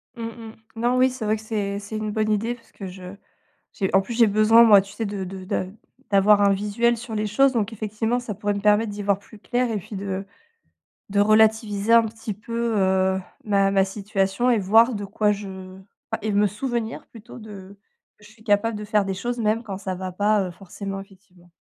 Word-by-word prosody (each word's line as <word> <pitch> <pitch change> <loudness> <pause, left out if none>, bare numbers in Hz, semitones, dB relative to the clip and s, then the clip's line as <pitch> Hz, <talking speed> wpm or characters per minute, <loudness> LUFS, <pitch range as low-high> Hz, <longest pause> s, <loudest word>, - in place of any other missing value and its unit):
Mmh 230 -1 -5
mh. 225 -1 -10 0.2
Non. 240 +2 +1
Oui, 255 +1 +4
c'est 255 -3 -6
vrai 215 +1 +2
que - - -11
c'est 205 -2 -3
c'est 205 +2 -6
une 215 0 -3
bonne 215 0 0
idée 220 +3 0
parce 235 -1 -18
que 200 - -9
je 185 0 -9 0.6
j'ai 190 -2 -1
en 195 - +6
plus 215 +5 -6
j'ai 230 0 +5
besoin 215 +2 +5
moi 210 -3 +8
tu 195 +1 -10
sais 225 - -3
de 200 -2 -4
de 185 0 -8
de 185 - -2 0.4
d'avoir 205 +1 +5
un 200 -1 +4
visuel 210 +4 +1
sur 230 0 -7
les 215 0 -1
choses 265 +6 +3
donc 225 -3 -1
effectivement, 220 +3 -2
ça 235 -4 -6
pourrait 205 +1 -2
me 200 - -3
permettre 210 +2 +3
d'y 205 0 -6
voir 200 -1 +1
plus 210 +2 -16
clair 245 +3 -1
et 220 - -1
puis 200 +2 -9
de 195 0 -4 0.8
de 200 0 +1
relativiser 215 0 +3
un 230 0 +8
petit 220 -1 -6
peu, 230 +3 -3
heu, 190 -1 +2 0.2
ma 200 -2 +2
ma 195 -1 +3
situation 195 +3 -1
et 235 - +3
voir 225 +5 +4
de 205 -1 -4
quoi 210 +1 0
je, 205 -1 -3 0.6
enfin - - -2
et 215 0 -1
me 205 +1 +3
souvenir 235 +2 -4
plutôt, 230 +2 -13
de 200 -3 -11 0.4
que 210 - -20
je 210 - -15
suis 220 0 -20
capable 215 +1 +1
de 210 - -6
faire 210 -1 +1
des 195 - -3
choses 240 +5 -4
même 220 0 0
quand 200 -5 -6
ça 190 -2 -4
va 185 0 -5
pas, 205 +1 +1
heu, - - -7
forcément 195 +2 -7
effectivement. 190 -3 -18
210 Hz, 225 wpm, -23 LUFS, 195-225 Hz, 0.8 s, moi